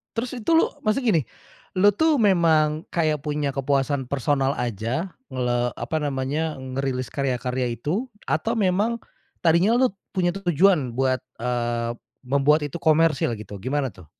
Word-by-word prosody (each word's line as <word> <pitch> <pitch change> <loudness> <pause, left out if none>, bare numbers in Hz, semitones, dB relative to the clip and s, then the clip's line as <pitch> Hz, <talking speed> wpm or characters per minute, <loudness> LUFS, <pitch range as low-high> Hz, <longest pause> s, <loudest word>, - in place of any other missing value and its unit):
Terus 235 +2 -2
itu 225 - -5
lu 325 - +4 0.2
maksudnya 250 +5 +1
gini, - - +2 0.5
lu 200 +2 +5
tuh 295 +5 +2
memang 160 -5 +3
kayak 155 -4 0
punya 150 -1 -1
kepuasan 135 0 0
personal 135 +1 0
aja 120 - -2 0.2
ngle 120 -1 0
apa 160 - -3
namanya, 145 +2 -1
ngerilis 130 -1 -3
karya-karya 125 -2 -1
itu 155 - -2 0.2
atau 160 +9 0
memang 215 +3 +1 0.4
tadinya 170 +6 +4
lu 255 +1 +4 0.2
punya 180 -2 +1
tujuan 175 -7 +2
buat, 130 +1 +1 0.2
eee, 120 -1 -1 0.3
membuat 140 +4 +3
itu 145 - -5
komersil 160 -6 +3
gitu 105 -1 -8
gimana 135 +6 -1
tuh? 90 -6 -15
145 Hz, 140 wpm, -24 LUFS, 130-175 Hz, 0.5 s, lu